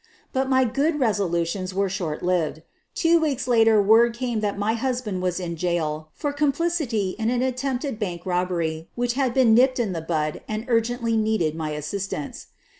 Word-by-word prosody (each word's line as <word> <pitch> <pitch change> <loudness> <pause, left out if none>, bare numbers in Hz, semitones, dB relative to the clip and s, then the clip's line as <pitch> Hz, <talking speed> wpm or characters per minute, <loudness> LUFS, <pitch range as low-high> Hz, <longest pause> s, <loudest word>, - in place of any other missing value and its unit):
But 265 0 0
my 260 0 +4
good 285 +6 0
resolutions 185 -5 0
were 200 0 +1
short 175 -5 -4
lived. 165 -3 0 0.3
Two 335 0 +4
weeks 280 -5 -1
later 225 -3 +5
word 225 +3 +5
came 240 -2 -2
that 205 -1 -2
my 205 +2 0
husband 230 -5 -2
was 180 -1 -1
in 170 -2 -4
jail 155 -3 -2
for 290 -1 -2
complicity 285 - 0
in 225 0 +1
an 245 +1 +1
attempted 260 -1 -2
bank 175 -5 -4
robbery 175 -3 -1
which 240 0 0
had 265 -1 +1
been 240 -3 +4
nipped 255 +3 +4
in 215 -6 0
the 165 - -3
bud 155 -2 -2
and 215 +1 -4
urgently 230 0 +1
needed 215 -8 +1
my 160 -1 -4
assistance. 150 +1 -5
220 Hz, 175 wpm, -24 LUFS, 175-250 Hz, 0.3 s, later